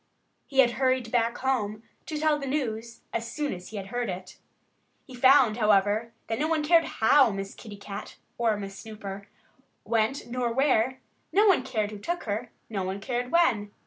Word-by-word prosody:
He 270 -1 +5
had 240 -2 +3
hurried 255 -3 +1
back 235 -1 +1
home 220 -5 -1 0.2
to 310 - -3
tell 305 -1 +2
the 275 - -5
news 235 -5 -3
as 230 0 -3
soon 295 0 -2
as 180 -1 -9
he 220 - -7
had 195 -1 -6
heard 245 -2 -2
it. 185 +1 -7 0.7
He 260 - -13
found, 255 -3 +5
however, 210 +1 +2
that 225 +1 -3
no 305 - +1
one 320 -2 +1
cared 330 +2 +5
how 260 +3 +4
Miss 195 -1 -5
Kitty 210 -3 -10
Cat 200 +1 -8 0.2
(or 225 -3 +2
Miss 195 -1 -6
Snooper), 200 -2 -8 0.6
went, 230 +4 0
nor 240 0 -2
where; 260 -1 +2 0.3
no 415 +2 +4
one 380 -9 +5
cared 220 -5 -2
who 210 - -8
took 345 - -3
her; 220 +3 -3 0.2
no 205 -4 -3
one 190 +2 -3
cared 245 +3 -3
when. 255 -12 +3
230 Hz, 185 wpm, -27 LUFS, 210-265 Hz, 0.7 s, He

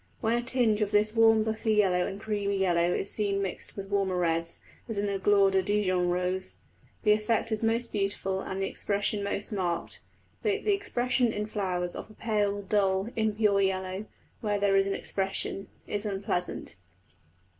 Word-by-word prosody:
When 230 +1 +1
a 240 - +1
tinge 235 -4 +1
of 210 - +1
this 210 +1 +2
warm 225 -1 +5
buffy 220 0 0
yellow 185 -4 +3
and 195 - -6
creamy 205 -2 -1
yellow 175 -2 +2
is 195 - -1
seen 200 -2 0
mixed 195 0 -5
with 195 0 -6
warmer 195 -2 +1
reds, 165 -1 0 0.3
as 225 - -3
in 200 - 0
the 200 -1 -1
Gloire 200 0 +4
de 190 0 +3
Dîjon 185 -3 +1
rose, 180 +1 -2 0.5
the 210 - +5
effect 215 +2 +1
is 215 - 0
most 230 +1 0
beautiful 195 -1 -1
and 190 - -4
the 195 - 0
expression 205 +1 -1
most 200 +1 -3
marked. 180 -4 -2 0.4
But 420 0 0
the 415 - +3
expression 250 - +1
in 210 -1 -2
flowers 185 -4 -2
of - - -7
a 215 - -15
pale 205 -2 0
dull, 195 0 +1
impure 215 -2 +2
yellow, 190 +1 -1 0.3
where 210 -2 0
there 200 -1 +3
is 195 0 +4
an 195 - -1
expression, 195 0 -2 0.2
is 205 0 -2
unpleasant. 195 - -3
200 Hz, 175 wpm, -28 LUFS, 190-215 Hz, 0.5 s, warm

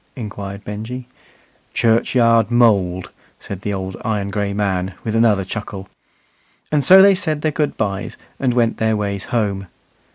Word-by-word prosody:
inquired 100 -3 -7
Benjy. 110 +5 -6 0.7
"Churchyard 115 0 +3
mould," 100 -7 +2 0.3
said 100 -2 -7
the 105 - -3
old 95 -1 -4
iron 105 -3 -2
gray 100 -1 -1
man, 95 -2 -1
with 110 -1 -2
another 110 -4 +3
chuckle. 100 -1 -6 0.8
And 150 -2 +2
so 190 +4 +8
they 200 0 +7
said 160 -6 -2
their 155 - +1
good 150 0 -1
byes 100 -3 -3 0.2
and 125 -3 0
went 115 -2 +2
their 110 -1 +1
ways 100 -1 -3
home. 100 -5 -1
105 Hz, 150 wpm, -19 LUFS, 100-120 Hz, 0.8 s, so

